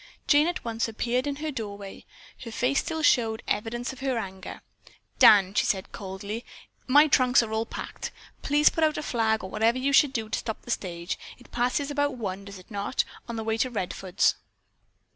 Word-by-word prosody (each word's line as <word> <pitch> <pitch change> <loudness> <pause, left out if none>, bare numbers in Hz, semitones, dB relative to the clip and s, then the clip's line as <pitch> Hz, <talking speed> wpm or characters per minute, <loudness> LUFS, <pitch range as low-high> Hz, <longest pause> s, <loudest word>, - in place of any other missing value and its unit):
Jane 295 +2 +5
at 350 -6 -3
once 230 0 -1
appeared 245 +4 -1
in 285 - -1
her 305 +2 -4
doorway. 205 -6 -7 0.4
Her 230 - -7
face 250 +5 +1
still 320 -2 -3
showed 225 -5 +3
evidence 240 +4 -2
of 265 - -13
her 265 -2 -1
anger. 190 -3 -6 0.6
"Dan," 195 -2 +7
she - - +2
said 190 -2 -1
coldly, 200 +4 -6 0.4
"my 290 +4 +7
trunks 255 -3 +4
are 220 -1 -5
all 220 +1 -1
packed. - - -6 0.3
Please 295 +1 +4
put 325 - -1
out 310 -1 +2
a 305 - -3
flag 220 -4 0
or 190 - -7
whatever 225 +3 +2
you 275 +2 0
should 285 0 +6
do 225 -5 -3
to 215 - -2
stop 220 - -5
the 240 - -6
stage. 170 -5 -3 0.2
It 250 - -19
passes 250 +4 0
about 285 -2 0
one, 200 -3 -4
does 200 -1 -9
it 185 +4 -16
not, 200 -1 -1 0.3
on 235 - -3
the 225 - -3
way 220 0 -1
to 255 - +2
Redfords?" 190 -3 0
230 Hz, 200 wpm, -27 LUFS, 205-270 Hz, 0.6 s, Dan